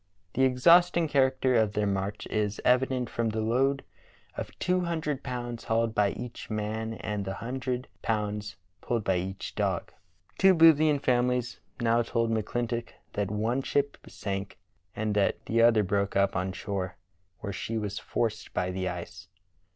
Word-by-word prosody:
The 130 +2 +3
exhaust 170 +8 +5
ing 165 -2 +2
character 130 -2 +2
of 110 -3 +3
their 105 0 +1
march 100 +1 -2
is 105 -1 0
evident 125 0 +3
from 115 0 -1
the 110 0 -2
load 130 +5 +1 0.5
of - - -4
two 180 0 +1
hundred 160 -5 -2
pounds 120 -2 -5
hauled 115 0 +1
by 105 -2 +3
each 120 0 -7
man 110 +1 -2
and 105 -2 -3
the 95 0 -4
hun 125 +5 -4
dred 125 0 -2
pounds 105 -2 -2 0.3
pulled 115 -3 -1
by 95 -2 +2
each 95 +2 -4
dog. - - -1 0.5
Two 190 -1 +6
Boothian 155 -2 +6
families 125 -1 +1 0.2
now 115 0 +3
told 115 0 0
McClintock 115 +2 -1 0.2
that 100 -1 -1
one 110 +5 0
ship 140 +1 0
sank 100 0 -5 0.4
and 110 0 -1
that 100 -1 +2
the 115 +1 +2
other 115 -2 +5
broke 100 0 0
up 100 0 +2
on 95 +1 -1
shore 95 -2 -4 0.5
where 100 -2 -4
she 115 +4 -3
was 105 -2 -3
forced 115 -1 -2
by 90 0 0
the 95 0 -2
ice. 85 -1 -7
115 Hz, 165 wpm, -28 LUFS, 105-125 Hz, 0.5 s, Two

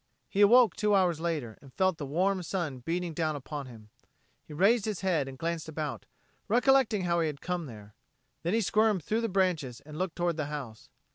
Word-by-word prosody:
He 200 - 0
awoke 230 0 +6
two 210 -1 +2
hours 180 -4 +2
later, 155 -10 -3
and 135 - -15
felt 185 -3 +1
the 145 - -4
warm 185 +6 +1
sun 165 -6 -3
beating 170 +6 -3
down 155 -1 -1
upon 145 0 -6
him. 110 -4 -13 0.5
He - - -17
raised 195 +8 +3
his 215 -4 -3
head 170 -8 +1
and 135 -1 -8
glanced 165 +1 -3
about, 155 -2 -5 0.4
recollecting 245 -3 +3
how 170 -1 +1
he 165 - +1
had 145 -2 -5
come 180 -3 -3
here. 105 -2 -12 0.5
Then 175 +6 0
he 230 - +2
squirmed 215 -3 +2
through 220 +9 0
the 230 - -1
branches 175 - 0
and 150 +2 -10
looked 185 -2 -2
toward 175 -2 -1
the 155 - -1
house. 135 -8 -7
170 Hz, 205 wpm, -29 LUFS, 145-195 Hz, 0.5 s, awoke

